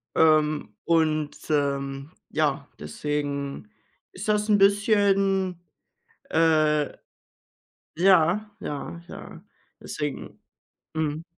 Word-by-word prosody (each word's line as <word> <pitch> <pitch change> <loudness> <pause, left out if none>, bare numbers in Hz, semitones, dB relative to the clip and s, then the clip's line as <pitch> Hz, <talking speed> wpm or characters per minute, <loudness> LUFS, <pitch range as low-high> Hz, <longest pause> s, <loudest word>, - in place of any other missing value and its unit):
Ähm, 155 -6 +3
und, 155 -3 +2 0.2
ähm, 140 -1 -1 0.2
ja, - - 0
deswegen 140 - -4 0.4
ist 185 +3 -7
das 210 0 +2
'n 210 - +5
bisschen, 195 -2 +3 0.7
äh 155 -2 +2 1.0
ja, 185 +3 +4
ja, 150 +4 -6
ja, 165 - -10 0.4
deswegen. 150 -2 -5 0.5
Mhm. 155 0 -2
160 Hz, 80 wpm, -25 LUFS, 145-195 Hz, 1.0 s, n